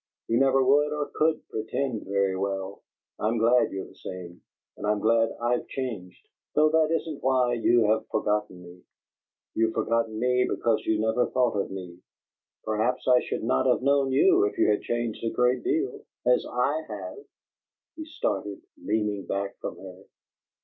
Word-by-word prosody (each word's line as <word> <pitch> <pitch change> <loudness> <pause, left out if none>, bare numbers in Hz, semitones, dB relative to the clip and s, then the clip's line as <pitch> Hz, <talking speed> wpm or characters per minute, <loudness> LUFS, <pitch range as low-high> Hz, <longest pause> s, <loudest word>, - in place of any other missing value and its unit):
"You 115 - +2
never 135 0 +4
would 145 +3 +3
or 150 -1 -3
could 155 0 0
pretend 110 +2 -3
very 100 -1 +1
well. 95 0 -3 0.4
I'm 110 +2 0
glad 120 +2 +3
you're 95 0 -5
the - - -15
same, 90 -2 -9 0.3
and - - -5
I'm 105 0 +2
glad 115 +1 +3
I've 120 +1 0
changed, 110 -9 -6 0.3
though 155 +1 +5
that 160 0 +3
isn't 160 -2 -2
why 130 -2 +2
you 120 0 +3
have 110 +1 +1
forgotten 105 -4 -1
me. 90 +1 -14 0.7
You've 110 0 +1
forgotten 115 -1 0
me 125 +1 +2
because 110 -2 0
you 110 -1 +2
never 110 +3 +1
thought 125 -3 +1
of 100 - -1
me. 90 -2 -8 0.6
Perhaps 110 +4 -1
I 125 -1 +6
should - - -4
not 65 0 +1
have - - +2
known 140 -1 +2
you 370 - +4
if 410 -1 -3
you 335 - +4
had - - +1
changed 120 -2 -3
a 115 - +1
great 125 +1 +1
deal 385 +4 -1 0.2
as - - +3
I - - 0
have!" - - -7 0.8
He 315 - -7
started, 100 - -3 0.2
leaning 105 -2 -1
back 100 0 -3
from - - -6
her. 95 0 -12
115 Hz, 170 wpm, -26 LUFS, 100-135 Hz, 0.8 s, I